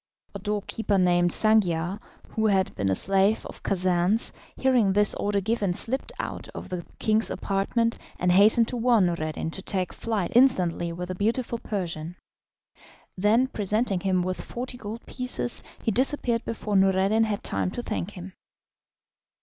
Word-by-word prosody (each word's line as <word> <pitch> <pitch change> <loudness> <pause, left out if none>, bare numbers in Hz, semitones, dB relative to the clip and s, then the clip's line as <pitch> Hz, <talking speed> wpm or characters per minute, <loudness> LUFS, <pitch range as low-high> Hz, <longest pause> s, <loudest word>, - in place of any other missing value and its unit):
A 200 - -6
doorkeeper, 210 +1 -1
named 175 -1 +3
Sangiar, 190 -4 +3 0.3
who 220 0 0
had 190 -2 +1
been 100 -1 -1
a 95 - +2
slave 195 - +3
of - - -10
Khacan's, 185 +3 +1 0.2
hearing 245 -7 +3
this 205 +1 +4
order 205 -1 -1
given, 205 -2 0
slipped 260 +8 -1
out - - -5
of - - -7
the 180 -2 -4
king's 220 +1 +1
apartment, 230 +4 -1 0.2
and 180 0 +1
hastened 215 +5 +5
to 250 - -3
warn 235 -4 +3
Noureddin 160 -2 -2
to 190 - -4
take 185 -2 -2
flight 215 -6 -2
instantly 185 -9 +3
with 180 +2 -6
the - - -2
beautiful 230 +5 -1
Persian. 175 -6 -4 1.0
Then, 210 +6 +3
presenting 210 -4 -1
him 185 -1 +1
with 185 0 -3
forty 245 +1 -5
gold 225 -1 -8
pieces, 250 -1 -2 0.2
he 225 - +1
disappeared 245 -1 +1
before 215 -2 -3
Noureddin 195 +3 +3
had 210 -2 -3
time - - -1
to 240 +6 -5
thank 215 -5 -3
him. 185 +1 -9
200 Hz, 155 wpm, -26 LUFS, 180-225 Hz, 1.0 s, hastened